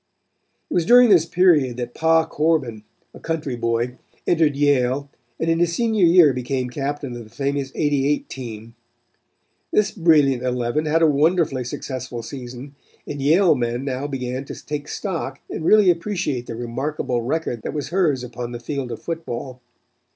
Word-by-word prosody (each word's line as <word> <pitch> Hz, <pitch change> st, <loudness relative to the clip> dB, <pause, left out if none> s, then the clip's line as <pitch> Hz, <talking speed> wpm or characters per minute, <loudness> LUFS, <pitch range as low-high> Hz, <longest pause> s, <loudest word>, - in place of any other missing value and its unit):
It -, -, -6 dB
was 175 Hz, -, +2 dB
during 245 Hz, 0 st, +7 dB
this 170 Hz, -4 st, +5 dB
period 160 Hz, -9 st, +3 dB
that 120 Hz, -1 st, -5 dB
Pa 160 Hz, 0 st, +3 dB
Corbin, 150 Hz, -9 st, 0 dB, 0.3 s
a -, -, -12 dB
country 155 Hz, -6 st, -3 dB
boy, 120 Hz, +1 st, -1 dB, 0.3 s
entered 160 Hz, -4 st, +2 dB
Yale 140 Hz, -1 st, +1 dB, 0.3 s
and 165 Hz, -, -1 dB
in 165 Hz, 0 st, +2 dB
his 170 Hz, -1 st, +1 dB
senior 220 Hz, -5 st, +3 dB
year 165 Hz, -5 st, +6 dB
became 125 Hz, 0 st, -3 dB
captain 140 Hz, -1 st, -4 dB
of 120 Hz, -, -7 dB
the 110 Hz, -, -16 dB
famous 140 Hz, +1 st, -2 dB
'88 145 Hz, -1 st, +1 dB
team. 115 Hz, -3 st, -8 dB, 1.0 s
This 210 Hz, -1 st, +2 dB
brilliant 150 Hz, -, +3 dB
eleven 125 Hz, +4 st, -1 dB
had 165 Hz, +2 st, +2 dB
a -, -, +6 dB
wonderfully 150 Hz, -2 st, +2 dB
successful 125 Hz, -1 st, -5 dB
season 125 Hz, +2 st, -8 dB, 0.3 s
and 145 Hz, -1 st, -6 dB
Yale 165 Hz, +6 st, +4 dB
men 120 Hz, -1 st, -2 dB
now 135 Hz, +1 st, -3 dB
began 130 Hz, -1 st, -4 dB
to -, -, -9 dB
take 150 Hz, 0 st, -4 dB
stock 165 Hz, -9 st, -4 dB
and -, -, -4 dB
really 205 Hz, +1 st, +6 dB
appreciate 170 Hz, -8 st, -2 dB
the 115 Hz, -, -5 dB
remarkable 120 Hz, +1 st, -3 dB
record 125 Hz, -2 st, -2 dB
that -, -, -5 dB
was 145 Hz, -3 st, -3 dB
hers 160 Hz, -8 st, +1 dB
upon 120 Hz, 0 st, -6 dB
the 120 Hz, -, -5 dB
field 130 Hz, +1 st, -4 dB
of -, -, -5 dB
football. 130 Hz, -6 st, -5 dB
140 Hz, 165 wpm, -22 LUFS, 125-165 Hz, 1.0 s, during